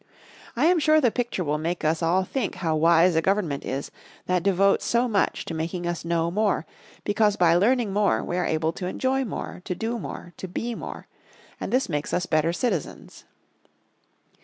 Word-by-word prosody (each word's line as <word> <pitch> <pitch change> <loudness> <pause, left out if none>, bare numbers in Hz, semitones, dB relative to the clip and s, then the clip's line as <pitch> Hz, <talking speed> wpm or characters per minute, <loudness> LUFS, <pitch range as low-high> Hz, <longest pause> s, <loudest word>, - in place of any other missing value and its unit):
I 255 +6 +2
am 350 +1 +4
sure 310 0 +4
the 245 -6 +3
picture 240 -6 -2
will 150 -1 -1
make 170 +1 -2
us 155 +2 +1
all 175 +3 +2
think 235 +3 -3
how 165 -3 -1
wise 165 +2 +4
a 160 - +3
Government 180 -6 0
is 135 +2 -4 0.3
that 180 -1 +1
devotes 195 +1 +3
so 240 +1 +2
much 205 -5 0
to - - -5
making 165 +2 -3
us 175 0 -3
know 170 0 0
more, 205 -4 +1 0.4
because 210 0 +2
by 175 -4 +4
learning 215 +3 +2
more 205 0 +2
we 175 - -3
are 180 - 0
able 160 +1 0
to 180 - -5
enjoy 265 +7 0
more, 210 -5 -6
to 180 - -3
do 230 +5 -3
more, 175 - -8
to 190 - -6
be 230 +6 -3
more. - - -7 0.5
And - - -4
this 255 +2 +2
makes 150 -3 -2
us 180 - 0
better 160 0 +1
citizens. 180 - -3
180 Hz, 190 wpm, -25 LUFS, 165-220 Hz, 0.5 s, am